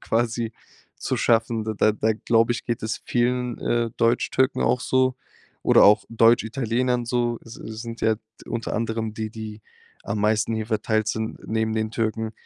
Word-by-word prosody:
quasi 115 0 -1 0.4
zu - - -2
schaffen. 115 -1 +2
Da 110 -1 -3
da 110 +1 +3
da 110 +1 +1
glaube 115 +1 +2
ich, 120 - -5
geht 120 -3 -3
es 110 +1 -3
vielen, 125 0 0
äh, 120 -1 0
Deutschtürken 120 +3 +2
auch 125 - +2
so 130 0 +2 0.5
oder - - +6
auch 105 +2 +6
Deutschitalienern 120 +2 +2
so. 120 -1 0
Es 115 - -10
es 110 +1 -7
sind 115 0 -7
ja 110 -1 +3 0.3
unter 115 -1 -4
anderem 110 -1 -2
die, 110 -1 -4
die 110 -1 -8 0.4
am 105 +1 -2
meisten 110 +1 +2
hier 110 -1 -3
verteilt 110 -1 0
sind 110 0 -3
neben 110 0 0
den 110 0 -1
Türken. 110 -1 -2
115 Hz, 170 wpm, -24 LUFS, 110-120 Hz, 0.5 s, oder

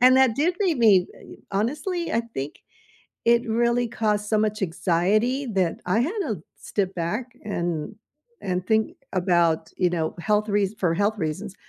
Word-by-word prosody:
and 255 +1 +7
that 260 -4 +4
did 335 +5 +2
make 350 -9 +2
me, 200 -6 +5 0.5
honestly, 300 - -1
I 230 - +2
think 135 +2 -4 0.7
it 235 0 +4
really 235 +1 +2
caused 210 -2 -1
so 215 0 +2
much 215 0 0
anxiety 195 +9 +1
that 190 -6 0
I 185 +5 +2
had 270 +8 +1
to - - -3 0.2
step 195 -2 -2
back 185 +9 -2 0.2
and 175 -3 -3 0.5
and 180 -1 -2
think 220 +9 +1 0.2
about, 170 -3 +2
you 180 - +3
know, 165 -2 -1
health 210 +3 +1
reas 205 0 +1
for 175 -3 +1
health 205 +5 +1
reasons. 190 +4 -4
210 Hz, 160 wpm, -24 LUFS, 180-235 Hz, 0.7 s, and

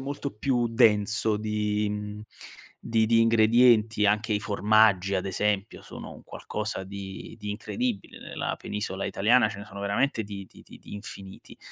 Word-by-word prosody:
molto 140 +1 -4
più 120 +1 +1
denso 110 -2 +3
di 105 0 -1
mhmm, 105 0 -5 0.6
di 110 -1 +1
di 115 0 +4
ingredienti. 115 -1 +4
Anche 105 +2 +1
i 105 - +1
formaggi 105 -2 +3
ad 95 0 0
esempio 100 +1 -1
sono - - -9
un - - -13
qualcosa 105 -2 -5
di 100 +2 -8
di 105 -2 -5
incredibile 105 0 -4
nella - - -4
penisola 100 -2 -4
italiana, 110 +3 +3
ce 105 -2 -8
ne 100 - -8
sono 100 -1 -9
veramente 110 +3 0
di 100 -2 -8
di - - -16
di - - -14
di - - -11
infiniti. 100 -2 -10
105 Hz, 160 wpm, -27 LUFS, 100-110 Hz, 0.6 s, di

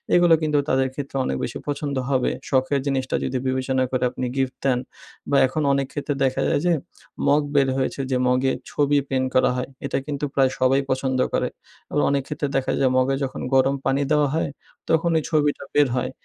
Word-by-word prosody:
এগুলো 175 -1 +5
কিন্তু 150 -1 +1
তাদের 130 0 +2
ক্ষেত্রে 140 -1 -5
অনেক 65 - -1
বেশি - - -4
পছন্দ 145 -1 -2
হবে। 130 -2 +1 0.2
শখের 130 +1 +2
জিনিসটা 130 -1 -1
যদি 130 0 -1
বিবেচনা 130 0 0
করে, 130 -1 0
আপনি 130 - -4
গিফট 130 -1 -1
দেন, 130 -2 +3 0.5
বা 140 - +3
এখন 155 +4 -2
অনেক 135 -1 0
ক্ষেত্রে 145 0 -2
দেখা 130 -1 +1
যায় 150 - +2
যে, 175 - +4 0.5
মগ 145 +1 +4
বের 135 -1 +4
হয়েছে 135 +1 -1
যে, 130 - +2
মগে 130 +1 +2 0.2
ছবি 145 0 +2
প্রিন্ট 130 -1 0
করা 130 - +4
হয়। 125 - -3 0.2
এটা - - -1
কিন্তু 145 -1 -3
প্রায় 135 -2 +3
সবাই 130 +2 +3
পছন্দ 130 0 0
করে, - - +1 0.4
এবং 145 - +1
অনেক 140 -1 +1
ক্ষেত্রে 150 -1 -2
দেখা 135 - 0
যায়, 130 -2 +3
মগে 130 +1 +2
যখন 130 - -6
গরম 135 +1 +4
পানি 135 +1 +2
দেওয়া 150 -1 +4
হয়, 160 - 0 0.4
তখন 165 +1 +2
এই 155 - -5
ছবিটা 150 -2 +1
বের 145 -2 +4
হয়। 125 - -1
135 Hz, 200 wpm, -23 LUFS, 130-145 Hz, 0.5 s, এগুলো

